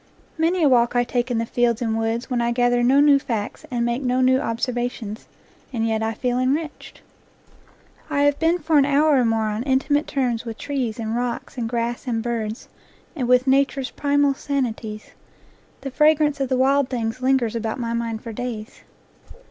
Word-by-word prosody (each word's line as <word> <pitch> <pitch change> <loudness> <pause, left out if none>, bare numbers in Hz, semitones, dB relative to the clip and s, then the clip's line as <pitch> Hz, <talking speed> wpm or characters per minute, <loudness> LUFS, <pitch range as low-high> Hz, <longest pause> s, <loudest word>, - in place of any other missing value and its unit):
Many 335 +2 +1
a - - +6
walk 240 -2 +3
I 245 - +4
take 245 0 -2
in 240 - 0
the 230 - 0
fields 235 -1 +1
and 225 -3 -1
woods 225 +2 -1
when 245 -2 -1
I 235 0 +1
gather 245 0 +2
no 260 +3 +4
new 285 -1 +6
facts 230 +4 -4
and 240 -3 -1
make 240 +2 -1
no 255 -1 0
new 260 0 +4
observa 245 -1 -1
tions; 220 -3 -9 0.4
and 225 -3 -1
yet 220 -1 0
I 220 0 -1
feel 245 +2 -1
enriched. 290 +4 -3 1.1
I 285 -2 0
have 290 0 +2
been 330 +2 +2
for 315 -2 +2
an 275 - +4
hour 290 +1 +3
or 250 - +3
more 225 -1 +1
on 210 +1 -3
intimate 275 +3 +1
terms 250 -5 -1
with 225 -2 -7
trees 255 -6 -3
and 225 -1 -3
rocks 245 +1 -3
and 235 -3 -3
grass 235 +2 -3
and 225 -2 -1
birds 225 -2 -3 0.5
and 255 -6 -2
with 250 +1 +4
"Nature's 275 0 +1
primal 285 -1 +2
sanities"; 235 -7 -4 0.7
the 275 - -5
fragrance 300 0 +3
of 270 -2 -1
the 260 - +1
wild 275 +1 +2
things 235 0 -3
lingers 255 -3 +1
about 225 +1 -3
my 230 -1 -2
mind 230 -1 -3
for 230 - -6
days. 235 0 -6
245 Hz, 195 wpm, -22 LUFS, 230-275 Hz, 1.1 s, a